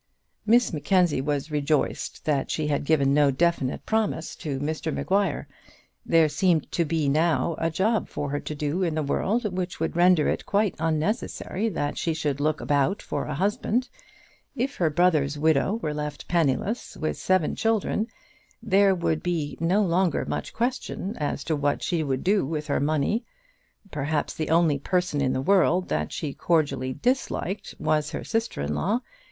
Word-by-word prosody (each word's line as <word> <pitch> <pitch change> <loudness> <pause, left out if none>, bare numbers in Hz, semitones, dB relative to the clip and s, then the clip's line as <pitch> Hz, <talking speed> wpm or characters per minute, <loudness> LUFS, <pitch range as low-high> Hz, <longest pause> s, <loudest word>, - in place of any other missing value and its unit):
Miss 235 -1 +4
Mackenzie 175 -1 +2
was 145 +1 -2
rejoiced 150 0 -1
that 145 -3 0
she 155 - -1
had 145 -1 -1
given 140 -3 +3
no 145 -1 +5
definite 140 -1 0
promise 215 -7 -1
to 140 -4 -4
Mr 155 +2 -2
Maguire. 195 -2 0 0.6
There 165 -1 +4
seemed 160 +1 +1
to 170 - +1
be 160 -1 0
now 165 +3 +2
a 165 - +1
job 210 +7 0
for 145 -1 -4
her 145 - -1
to 150 - -6
do 150 +5 -2
in 170 -4 0
the 155 - 0
world 210 - 0
which 180 -1 -3
would - - -2
render 175 -2 +4
it - - -2
quite 205 -1 +2
unnecessary 180 +6 -1
that 145 -7 -2
she 165 -2 -1
should 145 -3 -1
look 155 +1 +1
about 145 +8 +1
for 145 - -4
a 150 - -4
husband. 210 - 0 0.7
If 270 +2 -2
her 170 -3 +2
brother's 155 -3 +2
widow 155 +5 +2
were 150 - -1
left 150 -1 -5
penniless, 170 - 0
with 155 - -2
seven 185 -4 +1
children, 225 0 0 0.5
there 200 -3 +3
would 160 -3 0
be 160 -5 -2
no 180 +6 +2
longer 180 -1 +1
much - - -4
question 235 -4 -2
as 145 -1 -2
to 160 - 0
what 145 0 0
she 170 -3 0
would 135 -4 -2
do 200 +2 +3
with 150 +2 -3
her 145 - 0
money. 155 - 0 0.7
Perhaps 150 +1 -1
the 155 - -3
only 160 -3 +3
person 180 -2 0
in 130 -2 +1
the 130 - -1
world 185 0 +3
that 75 0 -1
she 145 -3 -4
cordially 140 -6 0
disliked 235 - -2
was 150 -1 0
her - - -5
sister 225 - -2
in 75 +1 -2
law. 210 - 0
160 Hz, 170 wpm, -25 LUFS, 145-190 Hz, 0.7 s, no